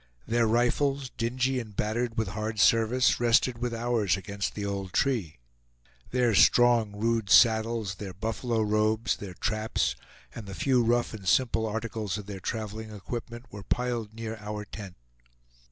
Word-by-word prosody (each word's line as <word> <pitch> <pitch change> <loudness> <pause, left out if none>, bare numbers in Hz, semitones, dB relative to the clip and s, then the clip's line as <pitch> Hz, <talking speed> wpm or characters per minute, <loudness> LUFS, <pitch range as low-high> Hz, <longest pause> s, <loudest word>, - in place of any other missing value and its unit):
Their 115 0 +2
rifles, 130 +4 +1
dingy 130 +3 -1
and 110 -4 -8
battered 115 +3 -1
with 110 -3 0
hard 110 +1 -4
service, 115 +4 +4
rested 120 0 +3
with 120 0 -2
ours 115 -5 0
against 100 0 -4
the 105 - -3
old 100 -2 -4
tree; 110 - 0 0.7
their 125 -2 +2
strong 120 0 +5
rude 115 -1 0
saddles, 110 -2 +4
their 100 0 -7
buffalo 110 +4 -2
robes, 110 0 +1
their 95 -3 -8
traps, 110 +2 -1 0.4
and 105 - -8
the 95 - -7
few 125 +7 +2
rough 120 +1 +1
and 100 -4 -8
simple 115 +1 +2
articles 110 -2 -3
of 105 - -7
their 100 -1 -7
traveling 110 +2 -5
equipment, 120 +3 -7
were 105 - -8
piled 115 0 -2
near 115 0 -5
our 105 0 -6
tent. 100 -4 -9
110 Hz, 155 wpm, -28 LUFS, 105-120 Hz, 0.7 s, strong